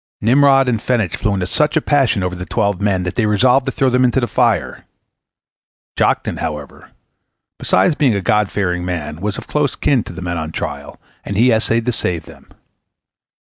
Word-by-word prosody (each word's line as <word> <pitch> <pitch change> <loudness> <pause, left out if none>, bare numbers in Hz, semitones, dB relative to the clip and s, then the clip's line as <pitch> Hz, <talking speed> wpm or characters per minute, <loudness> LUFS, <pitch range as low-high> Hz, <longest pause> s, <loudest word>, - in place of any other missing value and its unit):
Nimrod 135 +3 +4
and 115 -3 +1
Phenech 115 -10 0
flew 105 -2 -1
into 95 -2 -2
such 150 - +1
a - - +5
passion 135 -10 +1
over 90 0 -2
the 90 0 -6
twelve 100 -4 -1
men 100 -3 0
that 90 - -3
they 110 -3 +1
resolved 125 +6 +3
to - - 0
throw 135 -1 0
them 125 0 +2
into 125 +1 +2
the 120 - 0
fire. 110 - 0 1.1
Joktan, - - 0
however, 75 -2 -6 0.7
besides 180 - +2
being 135 -7 +2
a - - 0
God 105 +1 +1
fearing 90 -3 -1
man, 80 -3 -5
was 105 0 -3
of - - -8
close 150 -2 -1
kin 130 -6 +1
to - - -8
the 95 +1 -8
men 85 -1 -3
on 80 0 -5
trial, - - -6 0.2
and 100 - -5
he 120 +3 +4
essayed 115 +1 +1
to 125 - +1
save 90 -7 -3
them. - - -16
105 Hz, 195 wpm, -17 LUFS, 90-130 Hz, 1.1 s, a